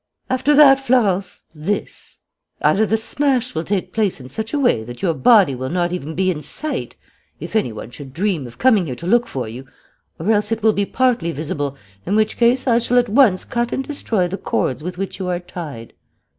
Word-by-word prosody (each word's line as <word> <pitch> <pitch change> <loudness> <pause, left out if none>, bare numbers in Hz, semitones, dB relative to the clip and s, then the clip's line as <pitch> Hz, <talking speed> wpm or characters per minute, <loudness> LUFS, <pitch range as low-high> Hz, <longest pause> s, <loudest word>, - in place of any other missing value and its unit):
After 265 +3 +2
that, 275 -2 +7
Florence, 205 -8 0
this: 170 +7 -5 0.4
either 215 +2 +3
the 220 - +2
smash 255 +2 0
will 160 - -2
take 185 -1 -2
place 210 -7 0
in 130 -1 -11
such 220 +6 -5
a - - 0
way 245 - +2
that 120 - -10
your 170 -4 +2
body 205 - +5
will 130 +1 -4
not 175 0 0
even 160 -3 -5
be 185 +1 +2
in 155 -4 -5
sight, 300 - -5 0.4
if - - -7
any 210 - +1
one 110 +2 -8
should 135 +1 -10
dream 170 -3 -1
of 120 - -13
coming 220 -9 +3
here 130 - -4
to 170 - -9
look 240 +6 +3
for 125 -4 -4
you, 125 +4 -9 0.5
or 215 - 0
else 210 0 +1
it 225 -1 -2
will 220 -1 +5
be 200 -1 -1
partly 245 -10 +1
visible, 145 -2 -4 0.3
in 200 - -1
which 215 0 +1
case 245 +2 +3
I 235 -3 +4
shall 240 +1 +1
at 245 -1 +3
once 215 -5 +4
cut 240 0 -2
and 270 - -1
destroy 225 -9 -1
the 195 +3 -5
cords 130 - -1
with 180 +1 -5
which 195 +1 -5
you 185 - -3
are 180 -1 -1
tied. 165 -10 -8
195 Hz, 215 wpm, -20 LUFS, 160-235 Hz, 0.5 s, that